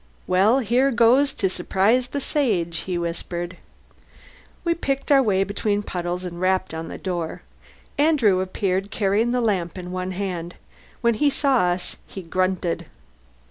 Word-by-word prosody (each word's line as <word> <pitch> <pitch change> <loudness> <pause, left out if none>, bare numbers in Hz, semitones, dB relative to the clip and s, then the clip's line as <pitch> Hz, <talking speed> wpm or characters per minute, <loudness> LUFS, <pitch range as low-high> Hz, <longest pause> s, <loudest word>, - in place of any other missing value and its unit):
"Well, 195 +7 +4
here 250 +4 +2
goes 250 +3 +4
to 195 - +1
surprise 210 +6 +1
the 285 - -3
Sage!" 200 - 0
he 180 -2 -1
whispered. 175 +1 -4 1.1
We 340 -1 +2
picked 275 -3 -2
our 275 -1 +7
way 195 -6 +2
between 205 +1 -1
puddles 180 -1 -3
and 175 0 -6
rapped 185 -1 +1
on 160 0 -5
the - - -7
door. 175 -4 -4 0.6
Andrew 275 -11 +4
appeared, 190 +1 -1
carrying 210 +2 +1
the 245 0 +1
lamp 190 -6 -1
in 180 -1 -7
one 185 0 -3
hand. 180 -3 -4 0.5
When 235 -1 +3
he 290 +6 +2
saw 275 -1 +2
us 175 0 -1
he 190 - -8
grunted. 175 -1 -1
190 Hz, 150 wpm, -23 LUFS, 180-240 Hz, 1.1 s, our